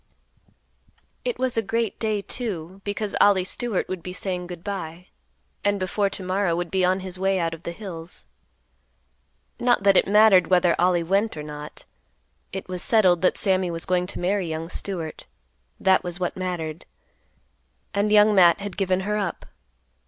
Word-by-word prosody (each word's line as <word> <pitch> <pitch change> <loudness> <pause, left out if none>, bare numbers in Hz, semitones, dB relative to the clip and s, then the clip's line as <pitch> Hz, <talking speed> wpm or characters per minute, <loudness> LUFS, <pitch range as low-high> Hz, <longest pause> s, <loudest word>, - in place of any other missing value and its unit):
It - - -2
was 255 -2 -1
a - - +4
great 225 +1 -2
day, 215 -2 -1
too, 195 -7 -4
because 205 0 -3
Ollie 200 -2 +5
Stewart 210 +2 -2
would 185 -2 -5
be 180 +2 -7
saying 180 -1 -3
good 175 -1 -9
by, 180 -3 -6 0.5
and 205 0 +1
before 195 +2 0
to 195 - -5
morrow 185 -1 0
would 175 -1 -3
be 190 -1 +1
on 185 +1 +2
his 185 -1 -6
way 190 0 +1
out 165 -1 -1
of 165 - -9
the 170 - -5
hills. 170 -3 -8 1.3
Not 240 -4 +2
that 195 -1 +5
it - - +4
mattered 200 -4 +6
whether 180 -2 +3
Ollie 175 -1 +3
went 195 +2 0
or 150 - -5
not. 150 0 -9 0.7
It 190 - -6
was 180 -1 -4
settled 185 -6 +3
that 185 - +2
Sammy 190 -3 +2
was 165 -1 -3
going 180 -1 0
to - - -6
marry 185 -1 0
young 160 +1 -4
Stewart; 170 -5 -5 0.5
that 190 -1 +3
was 175 0 -4
what 180 - -2
mattered. 175 -4 -4 1.1
And 205 +1 +1
Young 210 0 +6
Matt 180 -3 +6
had 200 -2 -6
given 190 -1 +1
her 210 +2 -1
up. 195 -5 -3
185 Hz, 175 wpm, -24 LUFS, 175-205 Hz, 1.3 s, mattered